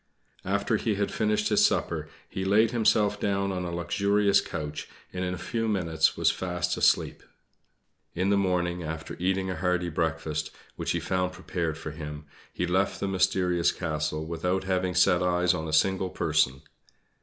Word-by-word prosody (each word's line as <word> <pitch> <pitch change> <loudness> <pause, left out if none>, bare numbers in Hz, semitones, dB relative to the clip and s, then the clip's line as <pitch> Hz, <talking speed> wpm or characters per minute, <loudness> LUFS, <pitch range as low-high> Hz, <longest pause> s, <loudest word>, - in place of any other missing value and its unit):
After 100 +3 +1
he 110 -1 -1
had 100 0 -1
finished 105 -1 +1
his - - +4
supper - - 0 0.2
he 95 - -4
laid 105 +4 +4
himself 105 -3 +2
down 100 -1 0
on 90 -1 -3
a 85 - -4
luxurious 100 +3 +2
couch, 75 -3 -5 0.2
and 90 0 -3
in 90 - -1
a 90 - -4
few 115 +5 -2
minutes 85 -6 +1
was - - +3
fast 90 -1 -2
asleep. - - +2 0.9
In 95 +3 +1
the - - +4
morning, 90 -2 0
after 80 0 -5
eating 95 +1 0
a - - -3
hearty 90 0 0
breakfast, 80 -1 -2 0.3
which - - -2
he 85 - 0
found 90 +1 -1
prepared 85 -4 -3
for 80 - -6
him, 75 -1 -7 0.3
he 90 - -2
left 95 +3 0
the 100 - -1
mysterious 90 -2 +2
castle, 75 -2 -3
without 90 +3 -1
having 95 -1 -1
set 90 0 +4
eyes 90 0 +2
on 80 -2 -3
a - - -4
single 95 +4 +2
person. 75 -6 +1
90 Hz, 170 wpm, -27 LUFS, 85-95 Hz, 0.9 s, his